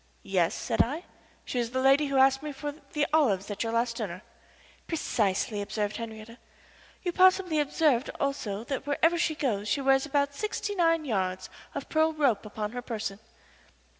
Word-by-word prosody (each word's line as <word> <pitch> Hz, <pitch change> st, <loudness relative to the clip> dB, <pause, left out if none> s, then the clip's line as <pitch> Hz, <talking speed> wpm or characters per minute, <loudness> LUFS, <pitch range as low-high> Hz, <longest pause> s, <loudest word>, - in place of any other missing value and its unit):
"Yes," 185 Hz, -4 st, +1 dB
said 230 Hz, -, +1 dB
I. 295 Hz, +8 st, -1 dB, 0.4 s
"She 250 Hz, -, -2 dB
is 235 Hz, -1 st, -1 dB
the 260 Hz, +2 st, -2 dB
lady 275 Hz, +3 st, +4 dB
who 275 Hz, -1 st, 0 dB
asked 270 Hz, 0 st, +5 dB
me 300 Hz, 0 st, -5 dB
for 290 Hz, +1 st, -5 dB, 0.2 s
the 300 Hz, -2 st, +2 dB
olives 210 Hz, -11 st, +2 dB
at 205 Hz, -, -4 dB
your 225 Hz, -, -1 dB
last 230 Hz, 0 st, 0 dB
dinner." 190 Hz, -4 st, -5 dB, 0.6 s
"Precisely," 210 Hz, -, 0 dB
observed 210 Hz, +1 st, -2 dB
Henriette. 230 Hz, 0 st, -8 dB, 0.6 s
"You 355 Hz, -, 0 dB
possibly 370 Hz, -3 st, +4 dB
observed 285 Hz, -3 st, +2 dB
also 230 Hz, -7 st, -2 dB
that 270 Hz, +2 st, -4 dB
wherever 330 Hz, +4 st, +2 dB
she 320 Hz, -2 st, +1 dB
goes 215 Hz, -9 st, -1 dB
she 280 Hz, -, +1 dB
wears 270 Hz, +1 st, +3 dB
about 280 Hz, 0 st, +1 dB
sixty 420 Hz, +3 st, -3 dB
nine 330 Hz, -4 st, +2 dB
yards 185 Hz, -6 st, -2 dB, 0.2 s
of -, -, -4 dB
pearl 315 Hz, 0 st, +2 dB
rope 270 Hz, -9 st, +1 dB
upon 210 Hz, 0 st, -4 dB
her 245 Hz, +1 st, -5 dB
person." 215 Hz, -4 st, -4 dB
265 Hz, 170 wpm, -28 LUFS, 215-300 Hz, 0.6 s, asked